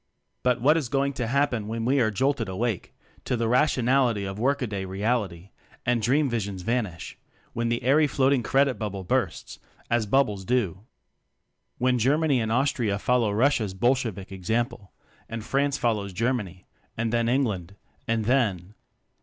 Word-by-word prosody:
But 125 Hz, -1 st, +2 dB
what 150 Hz, +7 st, +4 dB
is 140 Hz, -7 st, -2 dB
going 140 Hz, +1 st, 0 dB
to 125 Hz, -3 st, -3 dB
happen 125 Hz, -4 st, 0 dB
when 115 Hz, +1 st, -3 dB
we 135 Hz, +3 st, +3 dB
are 115 Hz, -3 st, +3 dB
jolted 120 Hz, 0 st, 0 dB
awake 105 Hz, +1 st, -2 dB, 0.3 s
to 125 Hz, -, -1 dB
the 115 Hz, 0 st, 0 dB
rationality 125 Hz, -4 st, +2 dB
of 95 Hz, +1 st, -5 dB
workaday 120 Hz, -6 st, 0 dB
reality, 100 Hz, -2 st, -2 dB, 0.3 s
and 120 Hz, -1 st, +1 dB
dream 140 Hz, +6 st, +2 dB
visions 100 Hz, -6 st, -3 dB
vanish; 110 Hz, -7 st, -3 dB, 0.3 s
when 115 Hz, 0 st, -1 dB
the 120 Hz, 0 st, -1 dB
airy 145 Hz, +5 st, +4 dB
floating 135 Hz, -1 st, +2 dB
credit 135 Hz, +2 st, +2 dB
bubble 100 Hz, -3 st, -4 dB
bursts 90 Hz, -, -2 dB, 0.3 s
as 120 Hz, -2 st, +1 dB
bub 135 Hz, +6 st, +4 dB
bles 100 Hz, -2 st, -6 dB
do? 100 Hz, -6 st, 0 dB, 1.0 s
When 125 Hz, 0 st, +2 dB
Germany 140 Hz, +2 st, +2 dB
and 110 Hz, 0 st, -2 dB
Austria 120 Hz, -5 st, +1 dB
follow 120 Hz, 0 st, +1 dB
Russia's 110 Hz, -3 st, +1 dB
(Bolshevik) 115 Hz, -4 st, 0 dB
example, 100 Hz, +2 st, -2 dB, 0.4 s
and 115 Hz, -1 st, -5 dB
France 140 Hz, +3 st, +1 dB
follows 105 Hz, -5 st, -1 dB
Germany, 105 Hz, -5 st, -2 dB, 0.3 s
and 115 Hz, 0 st, -1 dB
then 115 Hz, 0 st, +2 dB
England, 105 Hz, -9 st, -1 dB, 0.3 s
and 115 Hz, -2 st, 0 dB
then 105 Hz, -7 st, +1 dB
115 Hz, 155 wpm, -26 LUFS, 105-130 Hz, 1.0 s, what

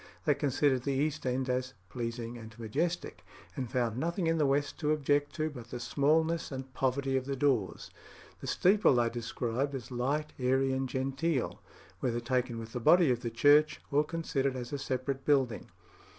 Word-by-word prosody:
They 150 Hz, -, +5 dB
considered 140 Hz, -2 st, +1 dB
the 140 Hz, +2 st, -1 dB
east 150 Hz, 0 st, -1 dB
end 130 Hz, +1 st, 0 dB
as 130 Hz, -1 st, -2 dB
"pleasing 115 Hz, +1 st, -4 dB
and 115 Hz, -1 st, -11 dB
majestic," 165 Hz, +11 st, -2 dB, 0.3 s
and 130 Hz, -5 st, -3 dB
found 120 Hz, -2 st, -1 dB
nothing 170 Hz, +4 st, -1 dB
in 165 Hz, 0 st, +2 dB
the 150 Hz, -, +3 dB
west 145 Hz, +1 st, 0 dB
to 150 Hz, -2 st, +1 dB
object 145 Hz, -1 st, +1 dB
to 155 Hz, -1 st, -1 dB
but 120 Hz, -5 st, -10 dB
the 120 Hz, -, -5 dB
smallness 155 Hz, +6 st, +1 dB
and 130 Hz, -1 st, -6 dB
poverty 135 Hz, +1 st, 0 dB
of 130 Hz, -, -2 dB
the 140 Hz, 0 st, -2 dB
doors. 130 Hz, -7 st, 0 dB, 0.5 s
The -, -, -7 dB
steeple 195 Hz, -6 st, +4 dB
they 120 Hz, -1 st, +2 dB
described 120 Hz, +3 st, -2 dB
as 130 Hz, -2 st, -7 dB
"light, 140 Hz, +5 st, -1 dB
airy, 130 Hz, +1 st, +2 dB
and 130 Hz, 0 st, -1 dB
genteel." 135 Hz, +3 st, -1 dB, 0.4 s
whether 120 Hz, -2 st, -1 dB
taken 125 Hz, 0 st, -1 dB
with 115 Hz, 0 st, -8 dB
the 125 Hz, -, -2 dB
body 170 Hz, +4 st, +5 dB
of 120 Hz, -, 0 dB
the 120 Hz, -, -2 dB
church 145 Hz, +6 st, +4 dB
or 145 Hz, +1 st, +4 dB
considered 145 Hz, -4 st, -1 dB
as 125 Hz, +1 st, -6 dB
a 140 Hz, -, -2 dB
separate 130 Hz, +1 st, -2 dB
building. 135 Hz, -6 st, +1 dB
135 Hz, 180 wpm, -31 LUFS, 125-145 Hz, 0.5 s, They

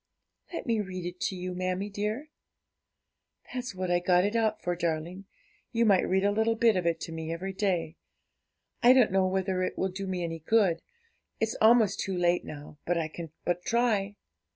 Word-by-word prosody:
'Let 340 Hz, -, -5 dB
me 230 Hz, -3 st, +1 dB
read 185 Hz, -3 st, -6 dB
it 175 Hz, +1 st, -6 dB
to 190 Hz, -, -4 dB
you, 180 Hz, 0 st, -4 dB
mammie 185 Hz, +2 st, -2 dB
dear.' 215 Hz, +9 st, -3 dB, 1.2 s
'That's 250 Hz, -5 st, -4 dB
what 185 Hz, -1 st, -2 dB
I 175 Hz, -, +3 dB
got 180 Hz, +1 st, +3 dB
it 205 Hz, +3 st, -1 dB
out 220 Hz, -2 st, +1 dB
for, 175 Hz, 0 st, -2 dB
darling; 170 Hz, +3 st, -3 dB, 0.5 s
you 230 Hz, 0 st, +2 dB
might 200 Hz, -4 st, +4 dB
read 190 Hz, +1 st, +2 dB
a 220 Hz, +3 st, +2 dB
bit 225 Hz, -1 st, +4 dB
of 180 Hz, -2 st, 0 dB
it 165 Hz, -1 st, +1 dB
to -, -, -5 dB
me 160 Hz, 0 st, -5 dB
every 190 Hz, +4 st, -4 dB
day; 175 Hz, -5 st, -1 dB, 0.8 s
I 245 Hz, +1 st, +8 dB
don't 250 Hz, -6 st, +5 dB
know 190 Hz, 0 st, +3 dB
whether 190 Hz, 0 st, 0 dB
it 185 Hz, -, -2 dB
will 190 Hz, -, 0 dB
do 190 Hz, +1 st, -5 dB
me 185 Hz, -2 st, -2 dB
any 165 Hz, -1 st, -4 dB
good, 180 Hz, -1 st, +2 dB, 0.6 s
it's 220 Hz, 0 st, 0 dB
almost 220 Hz, -3 st, +5 dB
too 190 Hz, -1 st, -2 dB
late 175 Hz, 0 st, +2 dB
now, 150 Hz, 0 st, -10 dB
but 175 Hz, 0 st, 0 dB
I 160 Hz, -2 st, -1 dB
can 165 Hz, +1 st, -7 dB, 0.2 s
but 175 Hz, 0 st, -1 dB
try.' 215 Hz, -4 st, +1 dB
185 Hz, 195 wpm, -29 LUFS, 175-210 Hz, 1.2 s, I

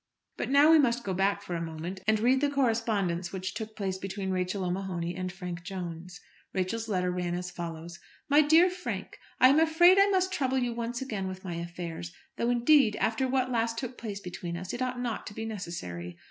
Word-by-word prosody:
But -, -, -3 dB
now 285 Hz, +3 st, +6 dB
we 325 Hz, -, +8 dB
must 245 Hz, -3 st, +2 dB
go 195 Hz, -, -2 dB
back 195 Hz, +2 st, +1 dB
for 180 Hz, -, -5 dB
a 170 Hz, -, -2 dB
moment, 165 Hz, +3 st, -5 dB
and 215 Hz, 0 st, +4 dB
read 255 Hz, +4 st, +3 dB
the 290 Hz, -, +3 dB
correspondence 220 Hz, -10 st, 0 dB
which 190 Hz, 0 st, -4 dB
took 220 Hz, -1 st, -6 dB
place 190 Hz, -2 st, -3 dB
between 195 Hz, 0 st, -4 dB
Rachel 185 Hz, +1 st, -1 dB
O'Mahony 180 Hz, -2 st, -2 dB
and 185 Hz, 0 st, -3 dB
Frank 180 Hz, -2 st, -6 dB
Jones. 180 Hz, -1 st, -7 dB, 0.4 s
Rachel's 205 Hz, +5 st, -1 dB
letter 180 Hz, -3 st, 0 dB
ran 180 Hz, -1 st, -2 dB
as 180 Hz, 0 st, -4 dB
follows: 170 Hz, -1 st, -7 dB, 0.3 s
MY 290 Hz, +1 st, +6 dB
DEAR 325 Hz, +5 st, +5 dB
FRANK, 365 Hz, 0 st, -5 dB, 0.2 s
I 255 Hz, -, +8 dB
am 285 Hz, +3 st, +5 dB
afraid 345 Hz, +4 st, +6 dB
I 395 Hz, -, +6 dB
must 375 Hz, -1 st, +1 dB
trouble 265 Hz, -5 st, 0 dB
you 245 Hz, -2 st, 0 dB
once 235 Hz, +2 st, -3 dB
again 210 Hz, -7 st, -3 dB
with 185 Hz, 0 st, -7 dB
my 175 Hz, -, -3 dB
affairs; 170 Hz, -, -6 dB, 0.2 s
though, 235 Hz, -, 0 dB
indeed, 245 Hz, -1 st, +4 dB
after 225 Hz, +5 st, 0 dB
what 255 Hz, 0 st, 0 dB
last 230 Hz, -1 st, 0 dB
took 250 Hz, 0 st, -4 dB
place 210 Hz, -4 st, -6 dB
between 175 Hz, -2 st, -6 dB
us 185 Hz, +1 st, -6 dB
it 245 Hz, -, -4 dB
ought 255 Hz, -1 st, -1 dB
not 240 Hz, -3 st, -3 dB
to 205 Hz, -, -8 dB
be 225 Hz, -, -4 dB
necessary. 90 Hz, -, -6 dB
200 Hz, 210 wpm, -29 LUFS, 180-250 Hz, 0.4 s, we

